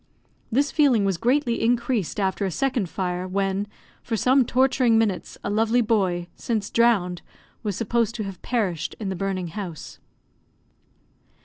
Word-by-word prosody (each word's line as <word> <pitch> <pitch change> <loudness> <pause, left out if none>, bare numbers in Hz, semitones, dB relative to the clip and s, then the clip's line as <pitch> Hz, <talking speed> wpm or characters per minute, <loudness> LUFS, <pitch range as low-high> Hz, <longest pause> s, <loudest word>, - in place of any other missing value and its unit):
This 280 +4 +2
feeling 260 -9 +3
was 195 -3 0
greatly 245 0 +1
increased 235 -5 0
after 195 +1 0
a 195 - 0
second 240 -1 -1
fire, 180 0 -3
when, 195 +1 -1 0.3
for 225 - -2
some 255 +4 +4
torturing 255 -2 +3
minutes, 210 -5 -1
a - - -2
lovely 225 +3 +2
boy, 190 -6 +1
since 215 -4 -2
drowned, 200 -7 +2 0.4
was 210 -4 -2
supposed 230 +1 0
to 220 - -3
have 195 -3 -7
perished 195 -9 -1
in 205 -3 -3
the 190 - -2
burning 185 -1 -2
house. 175 -4 -7
215 Hz, 145 wpm, -24 LUFS, 190-235 Hz, 0.4 s, some